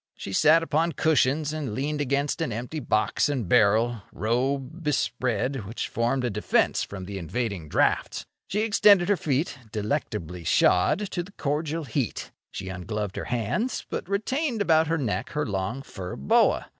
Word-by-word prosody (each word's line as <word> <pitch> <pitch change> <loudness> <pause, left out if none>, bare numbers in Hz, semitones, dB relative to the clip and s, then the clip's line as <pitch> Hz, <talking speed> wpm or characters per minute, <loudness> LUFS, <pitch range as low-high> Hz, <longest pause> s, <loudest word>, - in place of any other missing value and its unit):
She 95 - -7
sat 155 +9 +5
upon 165 +2 +1
cushions 150 0 +2
and 140 -9 -3
leaned 145 +3 -2
against 140 +3 0
an 160 - -1
empty 125 +8 -4
box 120 +2 +1
and 130 -9 -2
barrel, 115 +1 +3
robe 135 +7 -1
bespread, 130 -3 -1
which 115 - -4
formed 120 +3 0
a 120 - 0
defence 105 +1 +1
from 95 -2 -6
the 100 +1 -5
invading 95 -2 -3
draughts. - - +1 0.2
She 210 - -1
extended 205 -4 +5
her 205 - +5
feet, 145 -3 -1
delectably 105 - -3
shod, 140 - +3
to 175 - -1
the 190 +3 -11
cordial 155 +1 -2
heat. 135 -5 -3 0.2
She 95 - -7
ungloved 95 +2 -4
her - - -4
hands, 125 - -2
but - - -4
retained 240 +6 -1
about 160 -5 +3
her 165 +1 +1
neck 110 -11 -2
her 150 0 0
long 105 +5 -3
fur 95 -8 -7
boa. 70 - +2
135 Hz, 160 wpm, -26 LUFS, 105-160 Hz, 0.2 s, sat